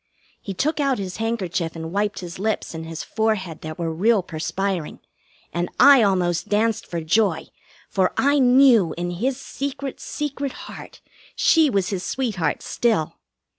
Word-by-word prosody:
He 195 - -6
took 305 - 0
out 275 -2 +2
his 190 -2 -5
handkerchief 190 -7 -2
and 160 0 -6
wiped 205 +1 -1
his 175 0 -8
lips 215 -2 -2
and 160 0 -6
his 165 0 -5
forehead 215 -7 -1
that 155 0 -7
were 165 -1 -2
real 205 +4 +2
perspiring, 175 +1 -3 0.5
and 175 +1 -1
I 280 -3 +8
almost 180 -4 +1
danced 220 +1 +1
for 170 -1 -4
joy, 185 +1 +1 0.4
for 190 -2 +1
I 285 +1 +3
knew 250 -7 +5
in 175 0 -2
his 250 +9 -2
secret, 275 0 -5
secret 285 -2 -4
heart - - -11 0.3
she 320 -3 +4
was 195 -6 0
his 195 -3 -2
sweetheart 205 - -2
still. 220 -10 0
200 Hz, 155 wpm, -23 LUFS, 175-250 Hz, 0.5 s, I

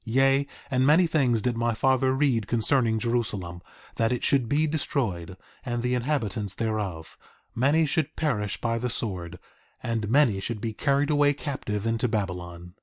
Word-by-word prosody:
Yea, 135 +4 +2 0.2
and 130 -1 +2
many 155 +6 +5
things 130 -9 +1
did 125 -2 0
my 115 0 0
father 130 +2 +2
read 130 -7 +1
concerning 115 0 +2
Jerusalem—that 115 -2 -3
it 125 - -2
should 130 -5 +2
be 150 +2 +2
destroyed, 110 - -2 0.3
and 120 -2 -3
the 125 0 0
inhabitants 115 -7 -1
thereof; 105 -8 -3 0.3
many 140 +7 +3
should 155 0 -1
perish 105 -11 -1
by 115 -1 -1
the 125 +1 -2
sword, 95 -8 -4 0.5
and 115 -3 -2
many 120 -6 +4
should 105 +3 -4
be 110 0 -3
carried 140 +4 +1
away 145 -1 +3
captive 115 -8 -4
into 115 +2 +1
Babylon. 90 -5 -4
120 Hz, 155 wpm, -26 LUFS, 105-140 Hz, 0.5 s, many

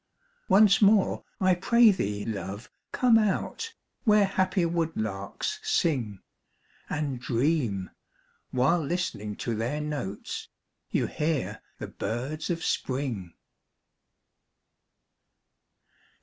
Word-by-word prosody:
Once 200 +1 +6
more, 205 -1 +4 0.2
I 185 -1 +4
pray 230 +5 +5
thee, 105 - -2
love, 105 0 -5 0.2
come 240 -3 +5
out, 220 - -1 0.3
Where 210 -3 +5
happy 190 -1 +1
woodlarks 160 - -2
sing, 145 - 0 0.7
And 145 -4 -2
dream, 120 - 0 0.6
while 135 +7 +2
listening 140 - -2
to 115 - -3
their 120 +7 -2
notes, 145 -10 -4 0.4
You - - +1
hear 155 -1 -2 0.2
the - - -5
birds 130 +9 -4
of 170 -1 -2
Spring. 125 - -2
150 Hz, 90 wpm, -27 LUFS, 115-190 Hz, 0.7 s, Once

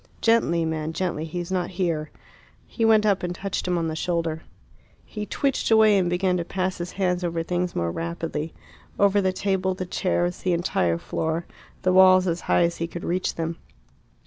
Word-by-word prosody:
"Gently, 200 -8 +2
man, 160 0 -3
gently; 170 -3 -2
he 165 +2 -5
is 175 +1 -5
not 180 -2 -1
here." 165 -5 -1 0.6
He 230 - -4
went 220 -1 +5
up 200 -2 +2
and 175 0 -3
touched 195 -1 -3
him 180 -1 +1
on 165 -1 -1
the 160 - -3
shoulder. 165 -1 -1 0.6
He 210 -1 -6
twitched 275 -2 0
away, 220 -2 +6
and 180 -2 +1
began 180 +1 +1
to 175 - -1
pass 185 +1 -2
his 175 0 -5
hands 180 -2 0
over 170 -1 -1
things 180 +1 -2
more 85 0 0
rapidly 165 - -4 0.5
over 200 0 +4
the 190 -1 +1
table, 190 0 -1
the 185 - -4
chairs, 175 -1 -1
the 185 - 0
entire 90 - +1
floor, 160 - -2 0.4
the 185 -1 +3
walls 185 0 +7
as 170 -1 -1
high - - +4
as 170 0 0
he 165 - -2
could 170 0 -8
reach 180 +2 -1
them. 165 0 -3
175 Hz, 195 wpm, -24 LUFS, 165-190 Hz, 0.6 s, walls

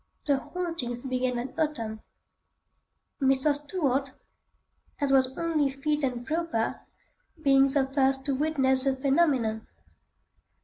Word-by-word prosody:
The 285 -2 +2
hauntings 330 -9 -5
began 255 -1 -1
that 250 +2 -5
autumn. 230 -9 -2 1.2
Mr. 270 +2 +3
Stuart, 285 -3 -1 0.9
as 285 -2 0
was 260 -1 +3
only 315 -4 0
fit 295 +2 -2
and 245 -2 -2
proper, 315 -7 -2 0.6
being 275 -2 +4
the 275 0 +1
first 270 0 +1
to 280 - +3
witness 265 -3 +3
the 270 -1 +2
phenomenon. 265 -6 +1
270 Hz, 115 wpm, -27 LUFS, 260-295 Hz, 1.2 s, being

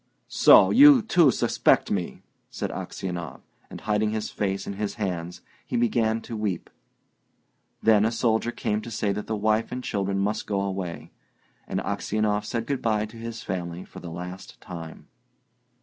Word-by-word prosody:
"So - - +7
you, 280 -2 +8
too, 175 -8 +5
suspect - - +2
me!" 90 -4 -3 0.3
said - - -4
Aksionov, 85 -6 -5 0.3
and, - - -9
hiding 105 0 +1
his 110 0 -3
face 95 -1 -2
in - - -4
his 105 +1 -3
hands, 90 -5 -4 0.2
he - - -3
began 115 -1 +1
to 115 - -7
weep. 105 -5 -3 1.1
Then 110 -2 +5
a 110 - +2
soldier 115 0 +1
came 105 -2 -2
to 115 - -8
say 110 -2 -1
that 105 - -5
the 110 - -1
wife 110 +2 +1
and 125 0 -4
children 100 -3 -1
must 100 +2 -1
go 100 -2 0
away; 95 -3 -4 0.6
and - - -2
Aksionov 105 -1 -1
said 115 +1 -3
good 140 0 -2
bye 110 -2 +1
to 110 +2 -12
his 115 -1 -7
family 90 -1 -4
for - - -11
the 85 - -8
last 90 +3 -8
time. 80 -3 -9
105 Hz, 165 wpm, -25 LUFS, 95-115 Hz, 1.1 s, you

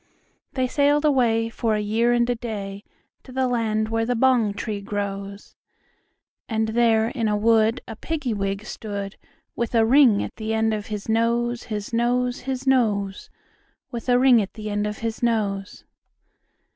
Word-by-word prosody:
They 260 -1 0
sailed 290 +3 +2
away, 235 -6 +2
for 225 -1 0
a - - 0
year 220 +3 +1
and 240 0 +2
a 245 - +1
day, 205 -4 -6 0.4
To 260 - -14
the 260 0 0
land 220 -3 0
where 225 0 0
the 245 +2 0
bong 240 -3 +3
tree 205 -1 -4
grows; 200 0 -5 0.9
And 220 -1 0
there 225 -1 +3
in 235 -4 -2
a 210 0 +1
wood 220 +1 +3
a 225 - -7
Piggy 285 -1 -3
wig 195 0 -3
stood, 200 -2 -6 0.4
With 235 0 -2
a 225 -1 +5
ring 245 -4 +5
at - - -8
the 220 0 -2
end 220 0 +1
of 210 -1 -4
his 210 -2 -5
nose, 235 +2 0
His 210 0 -5
nose, 245 +1 +1
His 265 0 -3
nose, 210 -7 +1 0.6
With 240 0 -5
a 245 - +5
ring 250 -3 +5
at 195 - -6
the 215 -2 -5
end 205 0 -1
of 210 - -4
his 225 -1 -3
nose. 205 -4 -1
225 Hz, 170 wpm, -23 LUFS, 210-240 Hz, 0.9 s, a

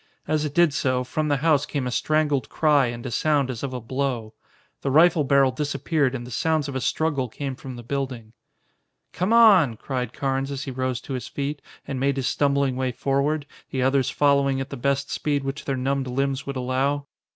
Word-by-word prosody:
As 155 -1 +1
it 145 0 -5
did 170 -4 +4
so, 130 -2 0
from 155 +4 -2
the 145 -1 +2
house 150 -3 +4
came 140 -4 -2
a 125 - -2
strangled 150 -2 +1
cry 145 -4 +3
and 120 +1 -6
a 130 - -4
sound 140 +1 +1
as 115 - -6
of 140 - -3
a 125 - -4
blow. 120 -2 -3 0.5
The 140 - -1
rifle 160 +2 +5
barrel 135 -1 +4
disappeared, 145 0 0
and 120 -2 -5
the 125 - -10
sounds 155 +1 0
of 140 - -6
a 130 - -1
struggle 140 -3 0
came 135 +3 -5
from 130 0 -8
the 120 - -9
building. 125 -3 -4 0.8
"Come 185 +4 -1
on!" 195 - +6
cried 125 -3 -3
Carnes 135 +1 -2
as 140 -1 -4
he 135 - -5
rose 130 -1 -2
to 135 - -7
his 125 - -4
feet, 145 +1 -4 0.3
and 135 -2 -3
made 140 +1 +1
his 130 - -1
stumbling 140 -2 +1
way 130 0 -1
forward, 140 +4 0 0.2
the 130 -1 -1
others 135 0 +2
following 140 -2 +2
at 135 +1 -5
the - - -4
best 140 +2 -1
speed 145 -2 -1
which 135 +2 -5
their 135 -1 -1
numbed 135 +1 -1
limbs 135 +2 -1
would 140 - -3
allow. 135 +3 0
135 Hz, 210 wpm, -24 LUFS, 130-145 Hz, 0.8 s, on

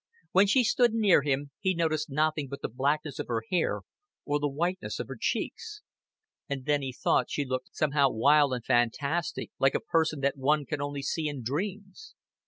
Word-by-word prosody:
When 195 +2 +5
she 250 +5 +4
stood 240 0 +3
near 205 -8 +5
him, 140 0 -1
he 190 -2 +1
noticed 155 -2 0
nothing 150 0 0
but 140 +1 -7
the - - 0
blackness 145 +2 -1
of - - -3
her 115 -2 -1
hair 180 - +1 0.4
or 145 0 0
the 145 0 0
whiteness 175 +6 -2
of - - -4
her - - -6
cheeks; 420 -2 -3 0.7
and 135 -2 -4
then 145 -1 +2
he 135 -1 -3
thought 125 - +1
she 145 - -2
looked 130 -1 -4
somehow 145 -2 +3
wild 145 +5 +4
and 125 -3 -3
fantastic, 140 +7 0
like 135 0 +3
a - - +2
person 155 -3 0
that 140 +1 0
one 145 +2 +2
can 155 0 -3
see - - -4
only 145 -1 -4 0.2
in 140 -4 -6
dreams. 195 - -5
145 Hz, 190 wpm, -28 LUFS, 140-170 Hz, 0.7 s, When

